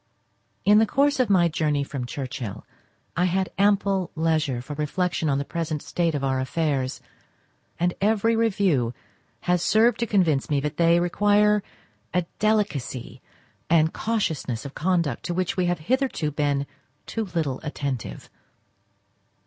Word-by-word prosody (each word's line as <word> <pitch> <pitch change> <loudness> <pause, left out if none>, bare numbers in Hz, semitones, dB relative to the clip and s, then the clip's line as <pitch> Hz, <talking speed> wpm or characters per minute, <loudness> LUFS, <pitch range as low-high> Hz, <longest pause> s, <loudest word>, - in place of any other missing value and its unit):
In 210 +1 +7
the 220 - +4
course 280 +3 +2
of 255 - +2
my 180 -4 +5
journey 150 -3 0
from 135 -3 -5
Churchhill 130 -5 -5 0.5
I 180 - +2
had 185 +1 0
ample 200 -2 +2
leisure 155 -5 +1
for 130 +4 -7
reflection 155 +2 -1
on 135 - +2
the 140 - -2
present 155 -2 -3
state 170 -3 0
of 140 - -2
our 135 -1 +1
affairs, 135 -1 -1 0.8
and 175 +1 +1
every 220 +2 +2
review 190 - +1 0.5
has 180 -1 +1
served 220 +5 +3
to 235 - 0
convince 165 -10 +2
me 145 -2 +2
that 150 +1 -3
they 170 0 +4
require 205 +4 +3 0.5
a 180 - +3 0.2
delicacy 140 - -1 0.5
and 160 -1 +4
cautiousness 160 - -2
of 140 - -7
conduct 170 -6 0
to 175 - -2
which 185 -1 -1
we 185 -1 +1
have 175 0 +1
hitherto 245 - -1
been 145 -1 0 0.4
too 225 - -3
little 160 -8 -2
attentive. 140 - -4
165 Hz, 145 wpm, -25 LUFS, 140-200 Hz, 0.8 s, In